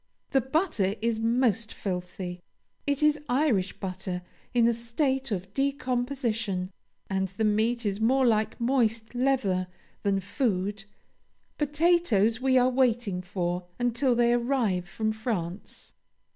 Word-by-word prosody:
The 270 - +4
butter 260 - 0
is 225 0 0
most 230 -1 +1
filthy 180 -1 -5 0.5
it 285 +1 +1
is 300 -1 +3
Irish 245 -8 +1
butter 185 -1 -4 0.3
in 235 -2 +4
a 235 - +3
state 265 +4 -1
of 190 -2 -4
decomposition; 245 -8 -1 0.4
and 190 -1 0
the 195 +4 -4
meat 220 +3 +1
is 205 +1 -1
more 260 +4 +3
like 220 -2 +1
moist 235 -2 +1
leather 245 -8 +1 0.3
than 200 -1 +1
food. 205 -1 -1 0.7
Potatoes 295 - +2
we 260 0 +3
are 250 0 +4
waiting 240 -7 +1
for 175 -1 -3
until 245 +1 +1
they 240 0 +4
arrive 235 -8 0
from 220 +2 -1
France." 215 -5 -4
230 Hz, 125 wpm, -27 LUFS, 195-255 Hz, 0.7 s, The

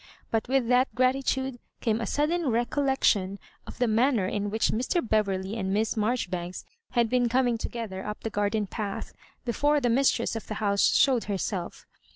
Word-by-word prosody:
But 225 -1 0
with 260 -2 +1
that 250 -1 +2
gratitude 260 0 +1 0.2
came 225 0 0
a - - -2
sudden 310 +1 0
recollection 235 -5 +1 0.3
of - - -9
the 245 - +2
manner 230 -1 +2
in 205 +2 -2
which 220 +2 +1
Mr. 250 - 0
Bever 210 -3 +2
ley 190 +3 -5
and 190 -4 -2
Miss 215 +2 +1
Marjoribanks 190 -6 -2 0.3
had 240 -2 +3
been 245 0 +2
coming 245 -1 +2
to - - -3
gether 215 -5 -5
up 210 0 -6
the 225 - -4
garden 205 +1 0
path, 200 0 -5 0.3
before 290 +5 +2
the 245 -3 +1
mistress 245 -2 +2
of 225 - -6
the 215 - -4
house 200 -1 +2
showed 255 -4 +4
herself. 195 -3 -3
230 Hz, 180 wpm, -27 LUFS, 205-255 Hz, 0.3 s, showed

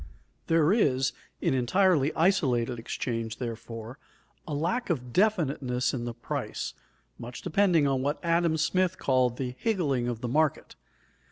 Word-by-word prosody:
There 165 +2 +4
is, 135 - +2 0.3
in - - +1
entirely 150 +3 +3
isolated 130 -9 +2
exchange, 115 -1 -3
therefore, 115 0 -6 0.5
a 155 - -4
lack 175 +12 -1
of 125 -7 -2
definiteness 140 - +1
in 120 -3 -3
the 120 - -4
price, 120 - -4 0.5
much 120 +2 -8
depending 180 -3 +3
on 135 -2 +1
what 145 +3 0
Adam 170 -1 +2
Smith 185 +3 +1
called 130 -2 +1
the 125 -2 -3
"higgling 145 - 0
of 120 -2 -3
the 125 - -2
market." 150 +4 0
135 Hz, 140 wpm, -28 LUFS, 125-170 Hz, 0.5 s, There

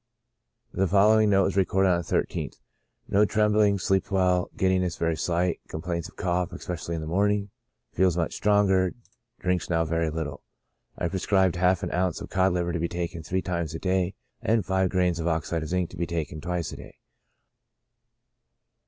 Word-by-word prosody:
The 95 +1 +1
following 105 +3 +5
note 100 -1 +4
was - - 0
recorded 95 0 +3
on 90 -1 +3
the - - -4
13th: - - -2 0.3
" - - -47
No 100 +2 +4
trembling, 105 -1 +3
sleeps 95 +1 0
well, 90 -2 +2
giddiness 95 -2 +1
very 85 -1 0
slight; 85 +2 0
complains 85 +1 -4
of - - -19
cough, 90 -2 -1
especially 85 -1 -5
in 80 - -4
the - - -5
morning; 100 +3 +1 0.4
feels 90 -2 +2
much 85 - -1
stronger; 95 -3 +2 0.5
drinks 90 -1 0
now 85 -1 +2
very 80 0 0
little." 75 -2 -4 0.6
I - - -1
prescribed 95 0 +1
half 90 0 +2
an - - -3
ounce 90 -1 0
of - - -9
cod 95 0 +2
liver 90 -1 -1
oil - - -2
to 85 - -1
be 85 - 0
taken 85 -1 -4
three 95 +4 -2
times 85 -3 -3
a - - -4
day, 95 0 0 0.3
and 110 -3 +1
five 95 -1 +1
grains 90 -2 +1
of 80 - -2
oxide 80 0 -1
of 80 - -5
zinc 90 -1 -1
to 90 - -10
be 85 0 -1
taken 80 -2 -4
twice 90 0 -3
a - - -8
day. - - -12
90 Hz, 190 wpm, -26 LUFS, 85-95 Hz, 0.6 s, following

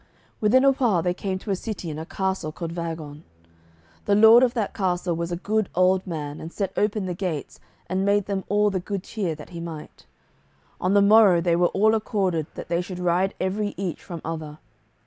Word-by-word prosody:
Within 240 +5 +4
a 275 - +7
while 230 -11 +1
they 180 0 +1
came 190 0 -3
to 200 +2 -5
a - - +2
city 190 -4 -5
and 150 - -6
a 160 - -7
castle 190 -5 -2
called 165 +1 -6
Vagon. 160 -3 -6 0.8
The 200 - +3
lord 220 +3 +8
of 255 -1 +2
that 220 -4 -1
castle 180 -2 -1
was 170 +1 -3
a - - -1
good 210 +3 -1
old 185 +1 +3
man 150 -4 -5
and 165 - -7
set 195 0 -3
open 210 -1 0
the 180 - -2
gates, 170 -5 -4 0.3
and 185 +2 -1
made 200 0 +2
them 195 -2 -2
all 210 0 +3
the 190 - -1
good 195 +1 -4
cheer 190 -8 -3
that 150 +2 -12
he 170 - -7
might. 165 -2 -9 0.7
On 185 +2 +1
the 200 - +6
morrow 205 -4 +6
they 170 0 +2
were 175 +1 +3
all 215 +4 +2
accorded 190 -7 0
that - - -7
they 170 +1 0
should 180 0 -7
ride 180 +2 +1
every 205 +2 -2
each 190 -4 -4
from 170 -3 -7
other. 155 -2 -5
185 Hz, 210 wpm, -24 LUFS, 170-205 Hz, 0.8 s, lord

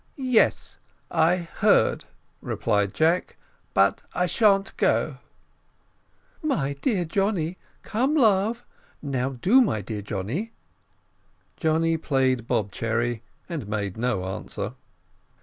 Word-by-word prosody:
"Yes, 255 -4 +1 0.3
I 165 +3 +4
heard," 170 -3 +2 0.4
replied 100 -1 0
Jack; 165 +3 +1 0.4
"but 95 0 +3
I 180 - +2
shan't 200 +2 +2
go." - - +1 1.2
"My 155 - 0
dear 180 - 0
Johnny 185 -1 -1 0.2
come, 260 +8 0
love 225 -2 +2 0.4
now 135 -2 -1
do, 195 - +4
my 110 - +1
dear 105 +1 -5
Johnny." 115 - -4 1.0
Johnny 165 0 +1
played 130 -6 0
bob 100 -2 0
cherry, 115 +1 -1 0.3
and 155 - -5
made 100 -3 -3
no 110 -5 -1
answer. 95 0 -5
155 Hz, 105 wpm, -25 LUFS, -, 1.2 s, I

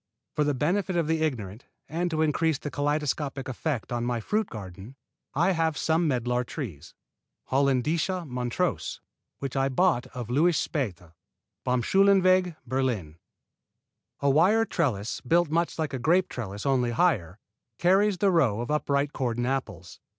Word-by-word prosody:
For 150 - +1
the 145 -1 0
benefit 180 +7 0
of 170 -2 +2
the 160 0 0
ignorant 115 -8 -3 0.2
and 175 +3 -1
to 160 -1 +1
increase 160 0 +1
the 145 - -6
kaleidoscopic 145 -1 -1
effect 130 -1 -3
on 120 -1 -1
my 120 -1 -1
fruit 210 - -1
garden, 100 +3 -9 0.4
I 170 +6 +3
have 160 -3 0
some 165 +1 +1
medlar 125 -2 0
trees, 105 - -7 0.6
Holländische 150 +7 +1
Monströse, 125 -2 -2 0.4
which 135 -2 -5
I 135 0 +2
bought 135 -2 +2
of 120 -2 -7
Louis 160 +5 +3
Späth, 90 - -3 0.5
Baumschulenweg, 185 - +3
Berlin. 120 - -2 1.0
A 140 - +3
wire 195 +10 +4
trellis, 120 - -1
built 170 +3 +2
much 170 +1 0
like 155 -3 -2
a 130 - -2
grape 175 +8 +2
trellis, 100 -4 -6
only 130 -3 +2
higher, 110 - +1 0.4
carries 195 +2 +3
the 195 +2 +3
row 130 - +2
of 120 +4 -3
upright 145 -1 0
cordon 120 -2 -1
apples. 110 -10 -4
140 Hz, 145 wpm, -27 LUFS, 120-165 Hz, 1.0 s, wire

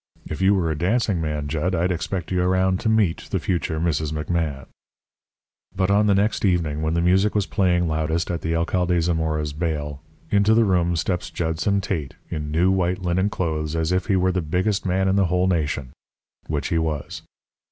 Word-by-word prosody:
If 80 - -5
you 95 +1 +4
were 85 -4 0
a - - -1
dancing 95 +2 +1
man, 75 -2 -2
Jud, 80 +5 -1
I'd 90 +2 +1
expect 85 +1 -3
you 90 -1 +1
around 95 +1 +2
to 110 - 0
meet 105 -7 +1
the - - 0
future 85 -3 -1
Mrs. 80 -2 0
McMahan.' 75 -3 -2 1.1
"But 95 0 +1
on 105 +1 +4
the 100 - +4
next 100 +2 +1
evening, 85 -6 +1
when 80 +1 0
the 85 - +1
music 95 +4 +3
was 105 -2 +2
playing 90 -4 +1
loudest 80 +2 -1
at 85 - -3
the 80 0 -1
Alcade 90 +1 +1
Zamora's 80 -3 -1
baile, 75 -3 -3 0.3
into 105 +2 +4
the 115 0 +4
room 90 -3 +2
steps 90 +2 -2
Judson 85 +4 -1
Tate 80 -9 -3 0.2
in 75 -1 -3
new 85 +5 +2
white 90 0 0
linen 90 +3 +1
clothes 80 -5 -2
as 80 +1 0
if 90 0 0
he 100 - +2
were 95 0 +2
the 90 0 -1
biggest 95 +6 -1
man 95 +1 +1
in 95 +1 +2
the 100 - +4
whole 90 +1 +1
nation, 75 -7 -1 0.6
which 75 -2 -2
he 85 -3 +1
was. 80 -3 -3
85 Hz, 195 wpm, -23 LUFS, 80-95 Hz, 1.1 s, you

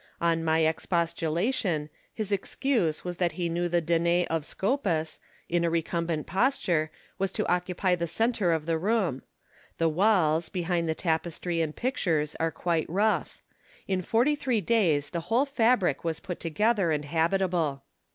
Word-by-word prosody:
On 165 -1 +1
my 160 0 +2
ex 160 0 0
postulation, 170 - 0 0.2
his 215 -2 -4
excuse 200 - 0
was 175 -1 -4
that 175 -3 0
he 170 +1 -2
knew 175 +1 -1
the 175 0 +2
Danae 170 +2 +2
of 165 -2 0
Scopas, 190 - -1 0.3
in 175 0 +1
a 170 - +2
recumbent 165 -1 -1
posture, 190 - +1 0.3
was 195 -1 0
to - - -1
occupy 180 +1 +1
the 170 -1 -1
centre 220 0 +1
of 160 -2 0
the 165 -1 0
room. 190 - 0 0.6
The 165 -1 +2
walls, 170 -3 +2
behind 175 -3 -1
the 160 - 0
tapestry 165 +1 -1
and 155 -2 -2
pictures, 165 - -1
are 165 - +1
quite 165 -1 -1
rough. 205 +6 0 0.4
In 190 -1 0
forty 235 - +2
three 255 -5 0
days 170 -8 +1
the 170 - -2
whole 245 +5 +3
fabric 235 - +2
was 165 -1 -2
put 185 -3 -6
together 200 +3 +1
and 150 -2 0
habitable. 165 -2 0
170 Hz, 160 wpm, -27 LUFS, 160-195 Hz, 0.6 s, whole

